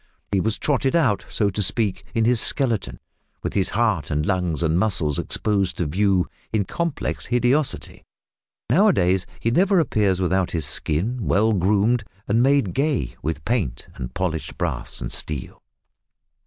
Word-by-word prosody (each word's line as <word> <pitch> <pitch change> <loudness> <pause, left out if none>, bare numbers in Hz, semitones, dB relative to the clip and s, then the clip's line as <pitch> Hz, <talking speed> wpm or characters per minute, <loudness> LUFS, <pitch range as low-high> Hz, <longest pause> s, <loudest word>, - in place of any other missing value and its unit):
He 100 - +2
was 110 +1 0
trotted 135 -1 0
out, 130 -12 +2
so 100 -2 0
to 105 - -2
speak, 100 0 +1
in 115 -1 +2
his 120 -1 +3
skeleton, 110 - 0 0.4
with - - -3
his 95 -3 +1
heart 110 -8 0
and 75 +1 0
lungs 90 -4 0
and 80 +1 +2
muscles 85 -8 +1
exposed 100 -4 -1
to 85 - 0
view 95 +3 +1 0.2
in 110 -2 +1
complex 170 - -3
hideosity! 125 +4 0 0.6
Now 185 - +4
a 205 - +5
days 90 +1 +1
he 115 - 0
never 190 - +3
appears 105 - +1
without 95 0 +1
his 80 -4 0
skin 90 - -2
well 110 +2 +3
groomed 105 +5 +2 0.2
and 110 +3 +2
made 135 -7 +3
gay 135 - 0
with 75 0 -4
paint 100 - -2
and 60 - -6
polished 85 -4 -3
brass - - -3
and - - -4
steel. 75 -5 -3
100 Hz, 160 wpm, -23 LUFS, 90-120 Hz, 0.6 s, a